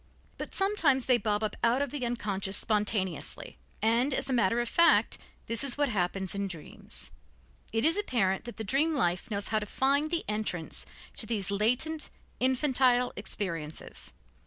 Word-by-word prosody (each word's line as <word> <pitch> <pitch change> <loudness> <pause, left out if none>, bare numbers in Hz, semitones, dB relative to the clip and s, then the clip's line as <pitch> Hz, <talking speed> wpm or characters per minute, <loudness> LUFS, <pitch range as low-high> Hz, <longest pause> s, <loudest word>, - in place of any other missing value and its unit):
But - - -6
sometimes 365 -10 +3
they 250 -2 +4
bob 210 0 0
up 215 - -2
out 235 +2 +3
of 280 - -5
the 290 -3 -4
unconscious 200 -5 -1
spontaneously, 210 - -1 0.2
and, 240 +5 +2
as 270 - -1
a - - +1
matter 230 -1 +2
of 240 - -1
fact, 335 +7 +4 0.3
this 230 +2 +3
is 275 -1 +2
what 290 -2 +1
happens 190 -2 -1
in 200 0 -2
dreams. 170 -5 -8 0.6
It 225 +4 +1
is 330 +4 +4
apparent 220 - 0
that 240 - -8
the 220 - -4
dream 295 +9 +2
life 185 -3 0
knows 200 -2 -2
how 215 - +2
to 210 - -6
find 280 +6 +1
the 340 0 -1
entrance 210 -6 -3 0.3
to 220 - -3
these 200 -4 -1
latent, 250 +10 +1 0.3
infantile 255 -1 +2
experiences. 165 - -4
230 Hz, 165 wpm, -29 LUFS, 200-265 Hz, 0.6 s, they